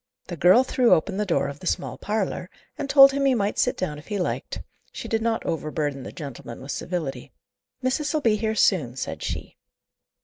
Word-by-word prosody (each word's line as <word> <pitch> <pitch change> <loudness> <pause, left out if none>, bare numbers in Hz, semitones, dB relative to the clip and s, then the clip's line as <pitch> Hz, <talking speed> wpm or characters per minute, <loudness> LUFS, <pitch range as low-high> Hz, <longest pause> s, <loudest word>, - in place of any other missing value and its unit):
The 175 - -4
girl 180 - +6
threw 255 -2 +4
open 190 +4 -2
the 210 0 -1
door 165 - +1
of 140 0 -7
the 180 - -7
small - - -1
parlour, 205 -3 -3 0.3
and 285 -2 -5
told 275 -1 +9
him 280 0 -1
he 265 -2 +4
might 205 -2 -1
sit 250 +1 +2
down 150 -5 -3
if 150 - -16
he 210 - -2
liked; 180 - -3 0.3
she - - -7
did 225 0 0
not 225 0 -1
overburden 150 -3 -2
the - - -8
gentleman 135 -6 -8
with 135 +1 -7
civility. 170 -7 -4 0.5
"Missis'll 295 +4 0
be 225 -5 +3
here 220 +1 -1
soon," 150 - +2
said - - -5
she. - - -5
195 Hz, 200 wpm, -24 LUFS, 155-235 Hz, 0.5 s, told